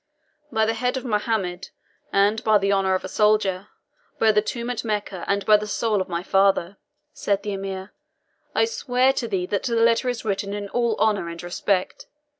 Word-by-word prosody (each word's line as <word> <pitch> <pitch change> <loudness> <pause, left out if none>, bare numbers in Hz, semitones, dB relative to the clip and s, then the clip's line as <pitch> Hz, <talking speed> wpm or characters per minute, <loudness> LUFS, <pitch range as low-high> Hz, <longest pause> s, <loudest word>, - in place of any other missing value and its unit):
"By 220 -2 +2
the 225 - +1
head 250 +3 -1
of 260 - -6
Mohammed, 210 -5 -1 0.4
and 205 +3 +2
by 215 -1 +5
the 200 0 +1
honour 190 -1 +2
of 185 - -3
a - - -4
soldier 210 -2 +1 0.5
by 220 - +4
the 210 0 +3
tomb 235 +3 -4
at 245 - -4
Mecca, 205 -5 -3
and 200 0 0
by 215 -1 +6
the 210 0 -5
soul 210 -1 0
of 185 - -5
my 170 0 -3
father," 195 -1 +2 0.4
said 200 -1 -1
the 205 -1 -3
Emir, 195 0 -6 0.6
"I - - +4
swear 260 - +1
to 240 - -2
thee 190 -4 -1
that 200 +1 -1
the 235 -2 -1
letter 230 +2 +3
is 245 -2 -4
written 200 -1 -2
in 205 -1 -5
all 235 -1 0
honour 210 -6 +1
and 170 0 -8
respect. 185 +2 -2
205 Hz, 200 wpm, -23 LUFS, 195-225 Hz, 0.6 s, by